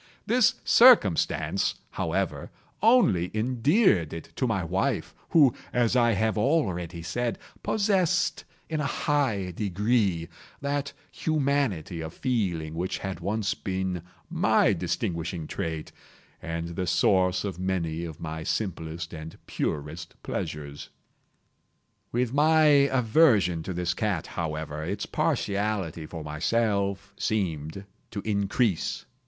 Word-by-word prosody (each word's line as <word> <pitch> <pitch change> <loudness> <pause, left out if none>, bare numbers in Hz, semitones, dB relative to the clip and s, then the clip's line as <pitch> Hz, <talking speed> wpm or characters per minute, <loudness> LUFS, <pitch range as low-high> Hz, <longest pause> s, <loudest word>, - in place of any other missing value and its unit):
This 245 0 +4
circumstance, 250 +1 +5 0.2
however, - - -2 0.3
only 220 - +4
endeared 125 - +2
it 80 - -8
to 130 - +1
my 100 -5 0
wife, 95 +4 -1 0.2
who, 145 -7 +5 0.2
as 120 0 +2
I 120 -2 +4
have 110 +2 +1
already 90 - 0
said, 120 +7 -2 0.2
possessed, 190 -5 +1 0.2
in 155 -1 -2
a - - -1
high 120 -14 0
degree, 100 -2 0 0.3
that 140 0 -2 0.2
humanity 140 - 0
of 80 -1 -7
feeling 90 -11 -1
which 90 +3 -2
had 95 -1 -5
once 105 0 -1
been 95 -2 -3 0.3
my - - +3
distinguishing 85 -1 -2
trait, 80 0 -4 0.5
and 85 0 -4
the 90 +2 -3
source 90 +1 +3
of 95 -4 -4
many 85 -3 -1
of 80 -2 -7
my 80 -1 -5
simplest 85 -2 -3
and 80 0 -8
purest 80 +3 -4
pleasures. 75 -1 -5 1.2
With 125 0 0
my 155 +2 +4 0.3
aversion 115 - +3
to 95 - -5
this 90 -1 -1
cat, 95 -4 -1
however, 80 -2 -4
its - - -3
partiality 100 -6 -1
for 80 -1 -7
myself 100 +5 -1
seemed 90 -3 -2 0.2
to 100 - -5
increase. 100 -1 0
95 Hz, 115 wpm, -27 LUFS, 85-120 Hz, 1.2 s, circumstance